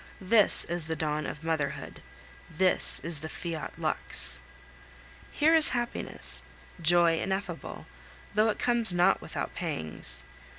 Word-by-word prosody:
This 205 Hz, +2 st, +6 dB
is 170 Hz, -2 st, -2 dB
the 160 Hz, 0 st, -2 dB
dawn 150 Hz, -1 st, -2 dB
of 150 Hz, -, -7 dB
motherhood, 160 Hz, -4 st, -3 dB, 0.5 s
this 185 Hz, +3 st, +2 dB
is 165 Hz, -2 st, -3 dB
the 160 Hz, +1 st, -6 dB
Fiat 160 Hz, -5 st, -5 dB
lux! -, -, -3 dB, 0.9 s
Here 315 Hz, +2 st, +3 dB
is 320 Hz, -1 st, +5 dB
happiness, 240 Hz, 0 st, -2 dB, 0.4 s
joy 170 Hz, 0 st, +4 dB
ineffable, 190 Hz, -3 st, -4 dB, 0.5 s
though 215 Hz, +2 st, +3 dB
it -, -, -1 dB
comes 240 Hz, -4 st, +1 dB
not 175 Hz, +2 st, +3 dB
without -, -, -5 dB
pangs. 80 Hz, -1 st, -4 dB
175 Hz, 125 wpm, -29 LUFS, 160-205 Hz, 0.9 s, This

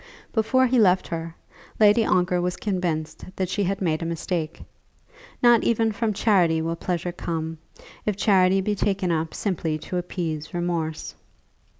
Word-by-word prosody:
Before 255 Hz, +4 st, +3 dB
he 250 Hz, 0 st, +2 dB
left 185 Hz, -3 st, +4 dB
her, 165 Hz, 0 st, -5 dB, 0.4 s
Lady 215 Hz, +1 st, +6 dB
Ongar 180 Hz, -2 st, +2 dB
was 180 Hz, 0 st, -1 dB
convinced 175 Hz, -6 st, -3 dB
that 185 Hz, -2 st, -2 dB
she 205 Hz, +2 st, 0 dB
had 195 Hz, +1 st, -2 dB
made 160 Hz, -2 st, 0 dB
a -, -, -3 dB
mistake. 165 Hz, -1 st, -3 dB, 0.8 s
Not 240 Hz, -2 st, +6 dB
even 225 Hz, -1 st, +2 dB
from 215 Hz, +1 st, -1 dB
charity 185 Hz, -6 st, +3 dB
will 165 Hz, +1 st, -2 dB
pleasure 175 Hz, 0 st, -3 dB
come, 165 Hz, -2 st, -4 dB, 0.4 s
if 210 Hz, -, -1 dB
charity 190 Hz, -2 st, +4 dB
be 210 Hz, +2 st, 0 dB
taken 195 Hz, -3 st, 0 dB
up 160 Hz, -1 st, -2 dB
simply 165 Hz, -6 st, -1 dB
to 170 Hz, +4 st, -5 dB
appease 165 Hz, -3 st, -4 dB
remorse. 170 Hz, -3 st, -2 dB
180 Hz, 155 wpm, -24 LUFS, 165-205 Hz, 0.8 s, Lady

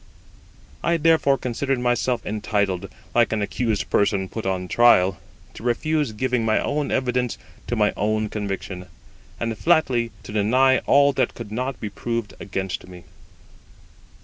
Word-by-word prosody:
I 170 Hz, 0 st, +2 dB
therefore 160 Hz, -4 st, +3 dB
considered 130 Hz, +2 st, -2 dB
myself 120 Hz, 0 st, 0 dB
entitled, 100 Hz, -3 st, -1 dB, 0.2 s
like 120 Hz, -1 st, +3 dB
an 110 Hz, -2 st, 0 dB
accused 110 Hz, 0 st, -2 dB
person 100 Hz, -2 st, +2 dB
put 110 Hz, -4 st, -5 dB
upon 95 Hz, -1 st, -1 dB
trial, 95 Hz, -3 st, +4 dB, 0.3 s
to -, -, -11 dB
refuse 145 Hz, +3 st, 0 dB
giving 125 Hz, +2 st, 0 dB
my 110 Hz, -1 st, +2 dB
own 145 Hz, 0 st, -1 dB
evidence 125 Hz, -2 st, 0 dB, 0.3 s
to -, -, -1 dB
my -, -, +2 dB
own 110 Hz, +1 st, 0 dB
conviction, 95 Hz, -3 st, -5 dB, 0.5 s
and 115 Hz, -1 st, -2 dB
flatly 130 Hz, -4 st, +2 dB
to -, -, -9 dB
deny 125 Hz, +6 st, +3 dB
all 140 Hz, 0 st, +5 dB
that -, -, 0 dB
could 115 Hz, -3 st, -8 dB
not 125 Hz, +3 st, -3 dB
be 105 Hz, -, -5 dB
proved 115 Hz, -1 st, -3 dB
against 95 Hz, -2 st, -4 dB
me. 90 Hz, -1 st, -12 dB
115 Hz, 145 wpm, -23 LUFS, 100-130 Hz, 0.5 s, all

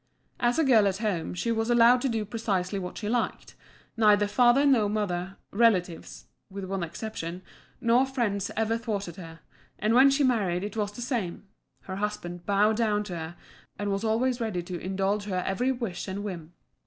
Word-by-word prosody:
As 240 Hz, 0 st, +2 dB
a 325 Hz, -, +3 dB
girl 230 Hz, -7 st, +5 dB
at 195 Hz, -1 st, 0 dB
home 200 Hz, -6 st, -2 dB
she 230 Hz, +6 st, -1 dB
was 225 Hz, 0 st, -1 dB
allowed 240 Hz, +1 st, +6 dB
to 270 Hz, -, 0 dB
do 225 Hz, -2 st, -1 dB
precisely 200 Hz, -3 st, -2 dB
what 180 Hz, -1 st, -6 dB
she 210 Hz, -, -4 dB
liked 240 Hz, +2 st, -2 dB, 0.4 s
neither 210 Hz, -2 st, +4 dB
father 245 Hz, +6 st, +4 dB
nor 235 Hz, -7 st, +4 dB
mother, 195 Hz, -3 st, -2 dB
relatives 195 Hz, -6 st, +1 dB, 0.2 s
(with 195 Hz, 0 st, -7 dB
one 190 Hz, 0 st, -3 dB
exception) 170 Hz, 0 st, -5 dB, 0.4 s
nor 240 Hz, +3 st, +3 dB
friends 225 Hz, -7 st, -1 dB
ever 225 Hz, +1 st, +1 dB
thwarted 205 Hz, -6 st, -4 dB
her; 165 Hz, -3 st, -10 dB, 0.4 s
and 215 Hz, +2 st, +1 dB
when 265 Hz, +3 st, +7 dB
she 275 Hz, +1 st, +2 dB
married 200 Hz, -9 st, +1 dB
it 205 Hz, 0 st, -5 dB
was 205 Hz, -2 st, -1 dB
the 240 Hz, +4 st, -7 dB
same: 230 Hz, -9 st, -3 dB, 0.4 s
her 190 Hz, 0 st, -6 dB
husband 175 Hz, -4 st, -4 dB
bowed 210 Hz, +2 st, +3 dB
down 210 Hz, -3 st, +1 dB
to 190 Hz, -4 st, -6 dB
her, 160 Hz, +1 st, -6 dB, 0.4 s
and 205 Hz, 0 st, -2 dB
was 195 Hz, +2 st, -2 dB
always 240 Hz, +3 st, +1 dB
ready 205 Hz, -6 st, -2 dB
to 175 Hz, 0 st, -6 dB
indulge 195 Hz, +3 st, -1 dB
her 185 Hz, -3 st, -2 dB
every 245 Hz, +7 st, 0 dB
wish 230 Hz, -9 st, -4 dB
and 195 Hz, +1 st, -4 dB
whim. 175 Hz, -5 st, -7 dB
210 Hz, 185 wpm, -27 LUFS, 185-230 Hz, 0.4 s, when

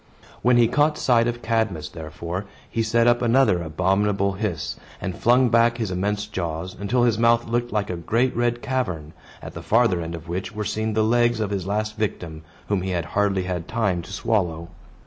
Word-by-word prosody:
When 125 Hz, 0 st, +4 dB
he 120 Hz, -1 st, +5 dB
caught 150 Hz, +5 st, +2 dB
sight 120 Hz, -2 st, +3 dB
of 120 Hz, 0 st, -3 dB
Cadmus, 110 Hz, -9 st, -1 dB
therefore, 85 Hz, +4 st, -6 dB, 0.2 s
he 115 Hz, -, -2 dB
set 115 Hz, +1 st, +2 dB
up 120 Hz, 0 st, +4 dB
another 120 Hz, -6 st, +3 dB
abominable 95 Hz, +5 st, +1 dB
hiss, 95 Hz, -4 st, -3 dB, 0.2 s
and 95 Hz, -2 st, -4 dB
flung 125 Hz, +1 st, +4 dB
back 115 Hz, +1 st, +3 dB
his 110 Hz, -5 st, -2 dB
immense 100 Hz, +3 st, -1 dB
jaws, 90 Hz, -3 st, -4 dB
until 120 Hz, +5 st, +1 dB
his 115 Hz, -3 st, +2 dB
mouth 115 Hz, 0 st, +3 dB
looked 120 Hz, +1 st, -1 dB
like 105 Hz, -2 st, -1 dB
a -, -, -2 dB
great 115 Hz, +9 st, 0 dB
red 120 Hz, 0 st, 0 dB
cavern, 95 Hz, -, -2 dB, 0.3 s
at -, -, -8 dB
the -, -, -7 dB
farther 115 Hz, -6 st, +2 dB
end 85 Hz, 0 st, -5 dB
of 85 Hz, 0 st, -10 dB
which 95 Hz, +5 st, -4 dB
were 105 Hz, 0 st, -3 dB
seen 110 Hz, +1 st, -2 dB
the 110 Hz, -, +3 dB
legs 120 Hz, +1 st, +2 dB
of 105 Hz, -2 st, -1 dB
his 95 Hz, -2 st, -3 dB
last 105 Hz, +1 st, -2 dB
victim, 85 Hz, -7 st, -3 dB, 0.3 s
whom 100 Hz, -2 st, 0 dB
he 95 Hz, -, -3 dB
had 85 Hz, -3 st, -1 dB
hardly 100 Hz, -2 st, +1 dB
had 90 Hz, -2 st, -4 dB
time 100 Hz, -7 st, 0 dB
to 90 Hz, -, -12 dB
swallow. 90 Hz, -6 st, -1 dB
105 Hz, 200 wpm, -23 LUFS, 90-115 Hz, 0.3 s, he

